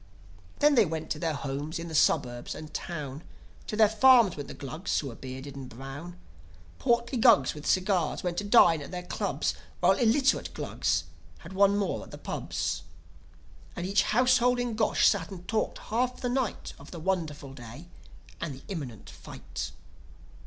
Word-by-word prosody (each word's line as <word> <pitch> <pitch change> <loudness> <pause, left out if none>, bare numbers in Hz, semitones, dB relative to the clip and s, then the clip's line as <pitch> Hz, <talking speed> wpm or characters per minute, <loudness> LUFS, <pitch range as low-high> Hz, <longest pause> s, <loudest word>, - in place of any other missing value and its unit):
Then 295 0 +5
they 235 -5 +6
went 160 0 -4
to 150 - -1
their 160 -2 -1
homes 140 +3 -4
in 165 0 -5
the 165 - -7
suburbs 120 -5 +1
and 155 -1 -9
town; 150 -5 -5 0.5
To - - -3
their 215 0 +6
farms 225 -2 +6
went 145 -2 -6
the - - -8
Glugs 155 +7 -3
who 140 - -2
were 115 - -9
bearded 130 +2 -8
and 135 -2 -8
brown. 135 +8 -8 0.6
Portly 235 0 +1
Glugs 220 - +5
with 150 -1 -8
cigars 185 -4 +1
went 175 -1 -2
to - - -3
dine 175 -7 +6
at 140 - -8
their 180 -1 -5
clubs, - - -1 0.3
While - - +4
illiterate 260 +3 +2
Glugs - - 0 0.3
had 170 +3 -11
one 200 +1 +4
more 200 -2 -1
at - - -11
the - - -9
pubs. - - -3 0.9
And 175 - -4
each 195 +2 +3
household 250 +2 +3
in 245 -1 -1
Gosh 220 0 +3
sat 175 -6 +1
and 180 -2 -10
talked 220 -1 -1
half 250 +3 -1
the 250 - -2
night 250 -3 -2
Of 140 - -12
the 170 - -8
wonderful 155 -6 -2
day, 125 +4 -10 0.6
and 160 -5 -3
the 130 - -14
imminent 140 - -6
fight. - - -7
175 Hz, 175 wpm, -28 LUFS, 145-220 Hz, 0.9 s, they